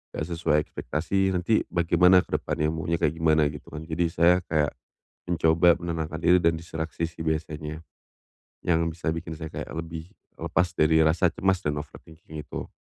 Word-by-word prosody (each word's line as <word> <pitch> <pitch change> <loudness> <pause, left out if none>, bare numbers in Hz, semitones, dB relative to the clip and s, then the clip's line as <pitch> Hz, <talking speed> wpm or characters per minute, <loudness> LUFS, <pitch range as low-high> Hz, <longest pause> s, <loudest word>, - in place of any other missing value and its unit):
nggak 80 - -2
sesuai 80 -2 +1
ekspektasi 95 +8 -1
nanti 90 +5 +2
bagaimana 90 +1 +4
ke - - -1
depannya 75 0 -1
maunya 80 +1 -1
kayak 80 -1 0
gimana 80 -1 +4
gitu 75 - -11
kan. 75 +1 -7
Jadi 85 +1 -1
saya 85 +2 +4
kayak 75 -3 +1 0.6
mencoba 85 0 +4
menenangkan 80 -2 -4
diri 90 +2 +5
dan 85 0 +3
diseleksi 80 0 -4
sih 85 0 -17
biasanya, 80 0 -3 0.9
yang 85 -1 +3
bisa 85 0 -3
bikin 85 0 -6
saya 80 - -5
kayak - - -6
lebih 80 0 -6 0.3
lepas 90 -2 0
dari 80 +1 +4
rasa 80 +3 +3
cemas 95 0 +1
dan 75 -1 -1
overthinking 80 +1 -10
itu. - - -6
80 Hz, 165 wpm, -26 LUFS, 80-85 Hz, 0.9 s, diri